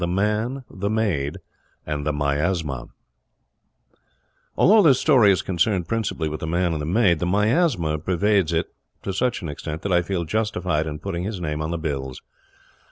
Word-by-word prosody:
THE 85 - 0
MAN, 105 +8 -1
THE 100 +2 -4
MAID, 95 -11 -1 0.5
AND 75 -1 -3
THE - - +2
MIASMA 75 0 -1 1.7
Although 215 +4 +6
this 140 -8 +5
story 125 -10 +5
is 95 - +1
concerned 90 0 0
principally 110 -7 -1
with 75 0 -4
the 80 - -4
Man 85 +1 +1
and 75 - -3
the 75 - -4
Maid, 90 -3 +3
the 90 - -1
Miasma 105 - +1
pervades 95 +1 +1
it 80 0 -1 0.3
to 95 - -3
such 120 +1 -1
an - - -3
extent 75 +2 -6
that 100 - -2
I 90 - +4
feel 85 0 -2
justified 90 -5 -1
in 75 -1 -4
putting 85 0 -4
his 100 0 -4
name 75 -3 -3
on 80 - -2
the 85 - -2
bills. 70 -5 -4
90 Hz, 175 wpm, -23 LUFS, 80-105 Hz, 1.7 s, Although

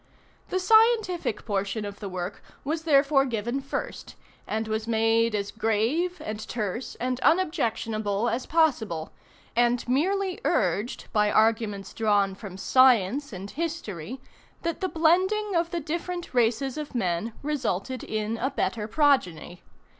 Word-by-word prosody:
The 370 - 0
scientific 440 - +3
portion 200 0 -2
of 205 0 -7
the 200 - -5
work 180 +1 -5 0.2
was 315 +3 -3
therefore 280 -2 +4
given 240 +1 -2
first, 275 - -5 0.3
and 220 +1 -2
was 220 +1 -2
made 225 0 +2
as 200 0 -2
grave 230 - 0
and 215 0 -4
terse 225 +1 -4
and 255 +1 -2
unobjectionable 225 - +1
as 240 +2 -2
possible; 235 - +1 0.4
and 240 +1 +2
merely 370 +8 +1
urged, 210 - 0
by 210 -2 +3
arguments 215 -3 +1
drawn 205 -3 +2
from 190 -1 -9
science 255 +3 +4
and 195 0 -7
history, 265 - -4 0.4
that 335 +2 -2
the 375 - 0
blending 375 +6 +2
of 335 0 +1
the 345 - -2
different 340 +2 -4
races 245 +3 +1
of 295 -3 -7
men 195 0 -1
resulted 260 -4 -2
in 215 +1 -2
a 260 +4 0
better 210 -5 -2
progeny. 210 - +1
235 Hz, 135 wpm, -26 LUFS, 210-310 Hz, 0.4 s, therefore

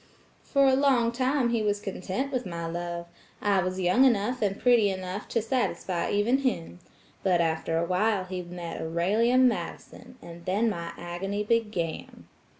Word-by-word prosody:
For 275 -1 +2
a 265 - +5
long 260 -4 +3
time 255 +1 +1
he 230 -1 +1
was 205 -1 0
content 195 +7 -4
with 255 -1 0
my 170 -3 -5
love. 170 +1 -4 0.3
I 200 -2 +2
was 185 +1 -2
young 185 +8 +4
enough 250 0 +2
and 200 -1 0
pretty 240 -5 +4
enough 185 +1 -5
to 230 - -1
satisfy 185 -7 -1
even 225 +6 +2
him. 180 -10 -2 0.4
But 180 -3 +2
after 165 0 0
a 170 - +1
while 190 +3 +1
he 185 0 -4
met 175 -1 -7
Aurelia 195 +10 +1
Madison, 250 0 -1
and 170 -3 -11
then 215 +5 +1
my 170 -3 -5
agony 195 +4 -3
began." 210 -7 -2
200 Hz, 160 wpm, -27 LUFS, 175-235 Hz, 0.4 s, a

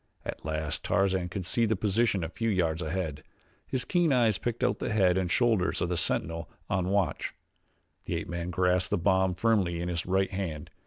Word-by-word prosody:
At - - -5
last 75 -1 -2
Tarzan 95 -2 +1
could 90 0 -4
see 115 +5 +1
the 110 - +2
position 100 -1 +1
a - - -1
few 115 +6 -2
yards 85 -5 +1
ahead. 80 -2 -3 0.5
His 130 - -2
keen 175 -4 +2
eyes 115 -6 +3
picked 120 -1 -2
out - - +1
the - - -2
head 95 -4 +3
and 95 -2 0
shoulders 110 -4 +2
of 90 - -1
the 90 - 0
sentinel 85 0 0 0.2
on 90 0 +1
watch. 100 -5 0 0.7
The - - -2
ape - - -3
man 85 0 -4
grasped 90 +1 +1
the 105 - +1
bomb 95 +1 +2
firmly 95 -4 +1
in 90 +1 -2
his 85 -1 -3
right 95 +1 +1
hand. 85 -6 -4
95 Hz, 200 wpm, -29 LUFS, 85-105 Hz, 0.7 s, eyes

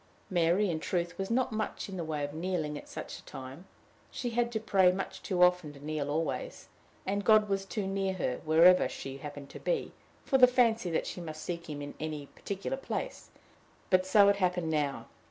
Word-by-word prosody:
Mary, 175 +3 +3
in 160 - -2
truth, 175 +1 -2
was 195 - -2
not 255 +2 +1
much 215 -1 -3
in 195 - -7
the 175 - -3
way 155 -2 -3
of 145 0 -4
kneeling 160 -2 -2
at - - -9
such - - -7
a - - -18
time: 135 +7 -9 0.4
she 245 - -4
had 240 +1 +1
to 220 - -1
pray 190 -4 +4
much 190 +1 -5
too 180 -2 +2
often 180 -4 +3
to 140 - -13
kneel 150 -2 -2
always, 165 - -3 0.4
and 200 +1 -1
God 215 -1 +5
was 195 -1 -1
too 195 +1 -3
near 195 0 -1
her, 125 -8 -2
wherever 165 +4 +6
she 135 0 -6
happened 145 0 -8
to - - -9
be, - - -1 0.3
for 265 - +3
the 250 - +10
fancy 230 -6 +2
that 165 - 0
she 180 - -5
must 155 -2 -7
seek 170 -2 -5
him 145 -1 -5
in 145 - -7
any 155 -2 -4
particular 200 - -5
place; - - -5 0.6
but 185 0 +5
so 200 +2 +6
it 200 0 +4
happened 180 -4 0
now. 145 -3 -1
180 Hz, 210 wpm, -31 LUFS, 155-200 Hz, 0.6 s, the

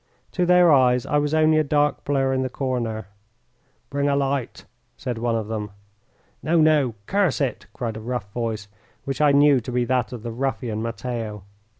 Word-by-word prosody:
To 180 -1 0
their 180 -1 +6
eyes 125 -3 +4
I 145 - +1
was 145 0 -1
only 155 0 +4
a - - +3
dark 145 0 +1
blur 135 -2 +1
in 130 - 0
the 130 - -2
corner. 120 -5 -3 0.9
"Bring 140 +1 0
a 140 - +2
light," 140 -2 -2 0.3
said 120 -3 -4
one 115 0 0
of 110 -2 -2
them. 105 -1 -4 0.7
"No, 165 +2 +2
no; 150 -7 +3
curse 195 -6 +1
it!" 135 -4 -2
cried 115 -3 -4
a - - -7
rough 115 -3 -4
voice, 110 -3 -3 0.4
which 135 +2 -3
I 150 -1 +5
knew 140 -1 +5
to 120 +1 -7
be 125 0 +1
that 125 -2 0
of 120 -3 -7
the 120 - -4
ruffian, 120 -3 -2
Matteo. 115 -3 -4
130 Hz, 190 wpm, -23 LUFS, 115-145 Hz, 0.9 s, their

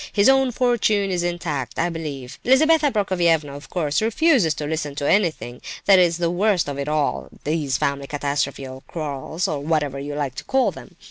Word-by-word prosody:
His 205 +4 +4
own 270 -1 +4
fortune 220 -5 +1
is 180 -1 0
intact, 170 -7 -3
I 175 - +1
believe. 145 -6 -6
Lizabetha 300 +3 +4
Prokofievna, 170 - +1
of 145 - -11
course, 155 -2 0
refuses 225 - +3
to 150 - -4
listen 150 -2 -3
to 145 0 -2
anything. 160 -11 0 0.2
That's 180 -4 +5
the 170 -1 0
worst 190 -1 +1
of 140 -1 -4
it 140 - -3
all, 150 -1 -1
these 145 -3 -1
family 140 0 -1
catastrophes 140 -1 -2
or 130 0 -9
quarrels, 155 +1 -3
or 150 - -2
whatever 145 -2 -1
you 145 +1 -5
like 145 -3 -2
to - - -21
call 265 -1 +1
them. - - -13
160 Hz, 185 wpm, -22 LUFS, 145-200 Hz, 0.2 s, That's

